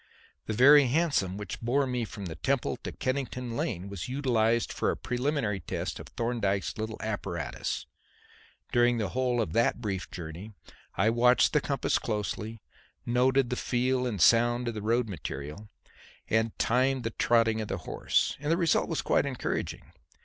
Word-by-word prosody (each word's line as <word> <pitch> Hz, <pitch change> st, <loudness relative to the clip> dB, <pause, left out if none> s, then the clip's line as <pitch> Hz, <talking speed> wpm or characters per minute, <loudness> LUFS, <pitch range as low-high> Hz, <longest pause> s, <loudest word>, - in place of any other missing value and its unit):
The 110 Hz, -, -1 dB
very 140 Hz, +4 st, +7 dB
hansom 130 Hz, -, +1 dB
which 105 Hz, -, -6 dB
bore 130 Hz, +4 st, +2 dB
me 125 Hz, -2 st, -2 dB
from 100 Hz, -2 st, -8 dB
the 85 Hz, -, -5 dB
Temple 125 Hz, -, -1 dB
to -, -, -6 dB
Kennington 125 Hz, -2 st, -3 dB
Lane 95 Hz, -5 st, -2 dB
was 100 Hz, +2 st, -6 dB
utilized 120 Hz, -4 st, +1 dB
for -, -, 0 dB
a -, -, -1 dB
preliminary 125 Hz, -5 st, -1 dB
test 80 Hz, -, -4 dB
of -, -, -9 dB
Thorndyke's 115 Hz, -5 st, -1 dB
little 110 Hz, 0 st, -4 dB
apparatus. 100 Hz, -5 st, -3 dB, 0.9 s
During 120 Hz, 0 st, +3 dB
the 105 Hz, -4 st, -1 dB
whole 125 Hz, +2 st, 0 dB
of 115 Hz, -, -1 dB
that 115 Hz, +1 st, +2 dB
brief 100 Hz, -4 st, -3 dB
journey 90 Hz, +5 st, -8 dB, 0.4 s
I 110 Hz, -, +3 dB
watched 125 Hz, +2 st, +4 dB
the 150 Hz, -, +3 dB
compass 140 Hz, -2 st, 0 dB
closely, 105 Hz, 0 st, -4 dB, 0.4 s
noted 125 Hz, +1 st, +2 dB
the -, -, +1 dB
feel 125 Hz, +1 st, 0 dB
and 105 Hz, -5 st, -3 dB
sound 120 Hz, +5 st, +4 dB
of -, -, -4 dB
the 105 Hz, -, -5 dB
road 115 Hz, +3 st, +1 dB
material 75 Hz, +1 st, -6 dB, 0.6 s
and 110 Hz, 0 st, 0 dB
timed 130 Hz, +2 st, +2 dB
the 115 Hz, -, -2 dB
trotting 115 Hz, -1 st, +2 dB
of 110 Hz, -, -4 dB
the -, -, -3 dB
horse. -, -, 0 dB
And 150 Hz, +2 st, -1 dB
the 165 Hz, -, +3 dB
result 170 Hz, -3 st, +2 dB
was 165 Hz, -, -1 dB
quite -, -, +2 dB
encouraging. 130 Hz, -3 st, -4 dB
120 Hz, 165 wpm, -29 LUFS, 105-125 Hz, 0.9 s, very